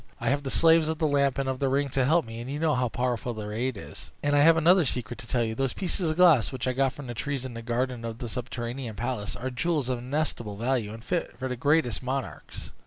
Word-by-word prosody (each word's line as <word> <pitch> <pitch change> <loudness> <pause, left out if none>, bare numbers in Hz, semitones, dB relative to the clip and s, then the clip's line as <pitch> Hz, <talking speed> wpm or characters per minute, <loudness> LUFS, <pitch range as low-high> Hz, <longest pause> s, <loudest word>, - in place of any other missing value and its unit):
I - - 0
have 140 +1 +1
the 140 - -4
slaves 165 +2 +5
of 160 0 -1
the 155 - 0
Lamp 140 -2 +2
and 135 -1 -1
of 130 -1 -2
the 135 - +1
Ring 140 +2 +1
to 130 -1 +1
help 165 +3 +3
me, 115 +1 -7
and 120 - -7
you 140 - -3
know 155 0 +2
how 125 -2 +1
powerful 120 0 -2
their 105 -1 -5
aid 120 +1 -1
is. - - -10
And 145 0 +2
I - - +5
have 165 +3 +6
another 175 +3 +5
secret 125 -5 -2
to 115 - -10
tell 120 0 +1
you: 110 -1 -2
those 135 +2 -1
pieces 180 -2 -1
of 155 - -2
glass, 170 -10 +5
which 130 -1 -3
I 130 - +1
got 135 0 +2
from 140 +1 -10
the 120 - -5
trees 135 +2 -3
in 130 - -6
the 115 - -6
garden 120 +1 -2
of 115 -1 -5
the 120 - -5
subterranean 120 0 -5
palace, 120 -4 -3
are 130 +1 -4
jewels 145 0 -1
of 125 -2 -1
inestimable 125 -5 -2
value, 115 -2 0
and 115 +1 -9
fit 175 +4 -2
for 130 - -3
the 125 - -3
greatest 140 0 +1
monarchs. 130 +1 -5
130 Hz, 270 wpm, -27 LUFS, 120-145 Hz, -, have